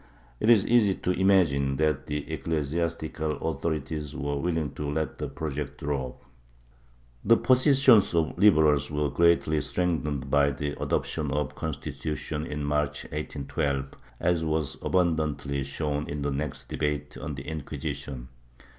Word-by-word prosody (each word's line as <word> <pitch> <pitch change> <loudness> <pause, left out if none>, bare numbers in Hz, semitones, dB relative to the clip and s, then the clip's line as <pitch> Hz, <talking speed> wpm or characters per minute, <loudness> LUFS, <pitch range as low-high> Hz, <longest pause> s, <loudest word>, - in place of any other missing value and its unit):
It 110 - +2
is 110 -5 +6
easy 110 -5 +4
to 90 - -1
imagine 85 -8 +3
that 75 -2 0
the 75 0 -3
ecclesiastical 80 0 -2
authorities 75 -2 -3
were 70 +1 -2
willing 80 -3 -1
to 75 +1 -4
let 80 +1 -2
the - - -2
project 75 -3 -5
drop.^ 70 -3 -2 1.1
The 115 - +6
position 130 -1 +6
of 100 - +2
the 85 -1 +3
Liberals 80 -7 +4
was 75 -1 -1
greatly 85 -3 +3
strengthened 75 -3 -1
by 70 -1 +4
the 70 +2 -3
adoption 75 -2 -1
of 75 -1 0
the - - -18
Constitution, 75 0 -4
in 75 0 -4
March 75 0 -1
1812, 70 -2 -2 0.3
as 85 -2 +1
was 80 -3 -1
abundantly 75 -6 0
shown 75 +1 -3
in 70 0 -3
the 70 - 0
next 70 0 -4
debate 75 -1 -2
on 75 +2 -5
the 65 - -7
Incjuisition. 70 -4 -5
75 Hz, 140 wpm, -27 LUFS, 70-80 Hz, 1.1 s, is